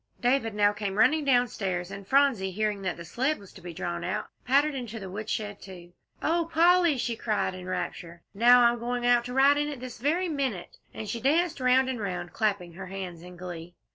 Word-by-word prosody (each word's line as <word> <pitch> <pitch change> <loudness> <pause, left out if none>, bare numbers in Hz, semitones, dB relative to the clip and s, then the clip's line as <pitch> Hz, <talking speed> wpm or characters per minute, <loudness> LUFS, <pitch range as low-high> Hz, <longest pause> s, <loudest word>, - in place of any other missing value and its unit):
David 240 -3 +1
now 205 0 +3
came 205 -2 -4
running 305 +7 +4
downstairs, 205 -9 0
and 195 -1 -8
Phronsie, 265 -8 +3
hearing 210 +1 -2
that 185 -3 -3
the 170 - -9
sled 265 - -1
was 200 -2 -15
to - - -13
be 175 - -7
drawn 85 - -4
out, - - -3 0.2
pattered 285 +4 +3
into 240 -4 -5
the 190 -2 -8
woodshed, 210 0 -4
too. 175 -2 -12 0.3
"Oh, 335 +1 +1
Polly," 340 -1 +4
she 240 -1 -2
cried 215 -4 -1
in 185 0 -9
rapture, 175 -2 -5
"now 245 +4 +6
I'm 235 0 +3
going 245 +1 -2
out 240 -1 +4
to 250 - -6
ride 280 +2 +5
on 295 - 0
it 290 -3 -5
this 250 -2 -8
very 325 +9 +1
minute," 270 - -3
and 220 - -7
she 230 +2 -4
danced 325 +4 +2
round 255 +1 +3
and 260 -3 -3
round, 180 -3 -4
clapping 200 -6 -1
her 185 +2 -8
hands 185 -3 -7
in 180 0 -12
glee. 175 -1 -8
220 Hz, 210 wpm, -27 LUFS, 185-265 Hz, 0.3 s, now